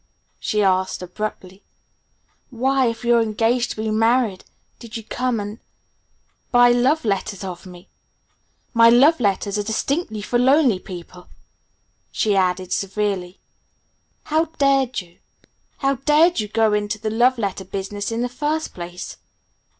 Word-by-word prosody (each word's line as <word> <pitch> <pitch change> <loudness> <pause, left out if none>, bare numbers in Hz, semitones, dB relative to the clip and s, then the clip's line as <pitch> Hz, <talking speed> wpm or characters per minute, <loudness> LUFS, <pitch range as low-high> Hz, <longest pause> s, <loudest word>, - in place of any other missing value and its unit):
she 210 -1 0
asked 185 -1 +1
abruptly, 190 0 -6 0.9
"why, 265 +1 +1
if 230 +1 -4
you're 235 -1 +4
engaged 225 +3 +1
to - - -5
be 220 0 -2
married, 225 -2 +1 0.4
did 230 -1 -8
you 225 - -8
come 250 +1 -2
and 205 +2 -6 0.9
buy 245 -1 +6
love 260 +5 +2
letters 200 -1 -2
of 185 -1 -7
me? 180 -1 -13 0.9
My 230 -1 +7
love 275 +7 +5
letters 200 -1 0
are - - -1
distinctly 220 - -2
for 240 +3 0
lonely 260 -5 +4
people," 180 -1 -10 0.8
she 210 -2 +1
added 185 -1 0
severely. 195 -2 -2 0.9
"How 315 +2 +1
dared 275 -6 +1
you 175 -1 -20 0.6
How 275 -1 0
dared 300 +5 +3
you 210 - -1
go 220 0 +2
into 210 +1 -1
the 215 0 -3
love 245 +3 +3
letter 200 -3 -3
business 200 +2 -5
in 230 +1 -1
the - - 0
first 300 +5 -3
place?" 175 0 -8
220 Hz, 140 wpm, -21 LUFS, 195-250 Hz, 0.9 s, My